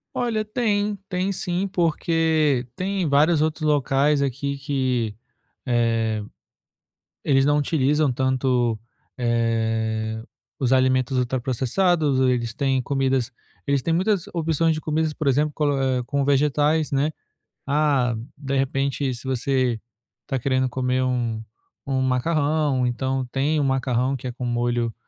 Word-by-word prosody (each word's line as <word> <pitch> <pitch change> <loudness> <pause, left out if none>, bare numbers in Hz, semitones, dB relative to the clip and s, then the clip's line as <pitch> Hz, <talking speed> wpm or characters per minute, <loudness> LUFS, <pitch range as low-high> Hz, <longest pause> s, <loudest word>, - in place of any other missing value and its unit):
Olha, 225 -3 -1
tem, 210 -2 0
tem 185 +1 -1
sim, 185 0 -1
porque 160 -6 +1
tem 190 0 -1
vários 150 +3 +4
outros 155 0 -1
locais 145 -1 +2
aqui 140 +1 -2
que, 130 -6 -1 0.5
eh, 115 -3 +1 1.0
eles 135 -1 +3
não 145 0 +3
utilizam 150 -1 +2
tanto, 130 -2 +1 0.4
eh, 110 -2 -1 0.4
os 130 -3 +2
alimentos 130 0 +2
ultraprocessados, 130 +5 +1
eles 120 -2 0
têm 135 0 0
comidas 130 -2 0 0.3
eles 140 -1 +2
têm 165 - 0
muitas 190 +1 +1
opções 165 -1 +1
de 155 - -4
comidas, 155 0 -1
por 155 0 -5
exemplo, 145 +3 +2
colo 145 -1 0
é, 130 -1 +1
com 140 +2 -1
vegetais, 150 +2 +2
né. 140 +2 +1 0.6
Ah, 140 -4 +2 0.2
de 140 -1 -3
repente, 135 0 0
se 120 - -10
você 130 -2 0 0.4
está 135 - -2
querendo 130 +1 +1
comer 130 0 0
um 120 -3 -1 0.5
um 135 -1 0
macarrão, 145 +1 +1
então 130 +2 -1
tem 145 +3 +1
o - - +1
macarrão 130 -1 0
que 130 - -7
é - - -3
com 125 +1 -6
molho 120 -1 0
135 Hz, 130 wpm, -23 LUFS, 125-150 Hz, 1.0 s, vários